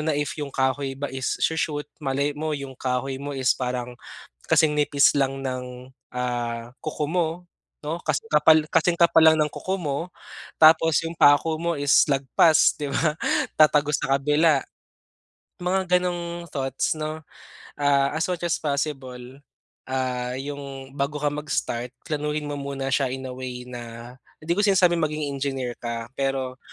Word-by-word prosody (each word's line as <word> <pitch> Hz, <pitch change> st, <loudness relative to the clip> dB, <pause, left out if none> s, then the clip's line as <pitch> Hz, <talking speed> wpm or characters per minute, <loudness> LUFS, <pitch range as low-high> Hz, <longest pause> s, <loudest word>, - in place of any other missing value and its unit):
na 160 Hz, -, +1 dB
if 145 Hz, +2 st, -2 dB
yung 145 Hz, -2 st, -5 dB
kahoy 135 Hz, +1 st, 0 dB
ba 140 Hz, +1 st, -4 dB
is 130 Hz, -1 st, -3 dB
sho-shoot 150 Hz, -2 st, -1 dB, 0.2 s
malay 140 Hz, +2 st, 0 dB
mo 155 Hz, +1 st, -2 dB
yung 140 Hz, -3 st, -6 dB
kahoy 130 Hz, +1 st, -2 dB
mo 145 Hz, +1 st, -5 dB
is 130 Hz, -2 st, +1 dB
parang 125 Hz, -1 st, -4 dB, 0.5 s
kasing 150 Hz, -2 st, +3 dB
nipis 145 Hz, -1 st, +4 dB
lang 135 Hz, -1 st, 0 dB
ng, 125 Hz, -1 st, -6 dB, 0.2 s
ah, 120 Hz, -1 st, -3 dB
kuko 150 Hz, -1 st, -2 dB
mo 170 Hz, 0 st, +1 dB, 0.5 s
no 155 Hz, +3 st, -3 dB
kasi 155 Hz, -3 st, 0 dB, 0.5 s
kasing 165 Hz, +2 st, +3 dB
kapal 170 Hz, -1 st, +5 dB
lang 160 Hz, -, +8 dB
ng 150 Hz, 0 st, +2 dB
kuko 190 Hz, -, -3 dB
mo 145 Hz, -5 st, -2 dB, 0.6 s
tapos 160 Hz, -1 st, +6 dB
yung 165 Hz, -, -4 dB
pako 150 Hz, +2 st, +5 dB
mo 170 Hz, 0 st, 0 dB
is 145 Hz, -1 st, +5 dB
lagpas 140 Hz, +4 st, +4 dB
di 145 Hz, -, -3 dB
ba 155 Hz, +2 st, 0 dB, 0.4 s
tatagos 150 Hz, -1 st, +4 dB
sa 135 Hz, -, +1 dB
kabila. 150 Hz, +1 st, +3 dB, 1.0 s
Mga 180 Hz, 0 st, +2 dB
ganong 175 Hz, -1 st, -4 dB
thoughts 135 Hz, 0 st, -1 dB
no, 155 Hz, +1 st, -4 dB, 0.6 s
ah, 140 Hz, -1 st, +3 dB
as 160 Hz, -, 0 dB
much 175 Hz, -1 st, -3 dB
as 170 Hz, -, 0 dB
possible, 135 Hz, -3 st, -4 dB, 0.5 s
ah, 125 Hz, -1 st, -2 dB
yung 135 Hz, -1 st, -7 dB
bago 145 Hz, +1 st, -1 dB
ka 145 Hz, -, +3 dB
magstart 125 Hz, -5 st, -3 dB, 0.2 s
planuhin 150 Hz, -1 st, -2 dB
mo 145 Hz, -, -3 dB
muna 135 Hz, -1 st, -4 dB
siya 135 Hz, -2 st, +1 dB
in 130 Hz, 0 st, -5 dB
a -, -, -6 dB
way 125 Hz, -1 st, -6 dB
na, 120 Hz, 0 st, -9 dB, 0.3 s
hindi 165 Hz, -, -1 dB
ko -, -, +4 dB
sinasabi 185 Hz, -3 st, +4 dB
maging 155 Hz, -2 st, -1 dB
engineer 135 Hz, -3 st, -3 dB
ka, 115 Hz, 0 st, -4 dB
pero 135 Hz, -1 st, -2 dB
140 Hz, 155 wpm, -24 LUFS, 130-155 Hz, 1.0 s, lang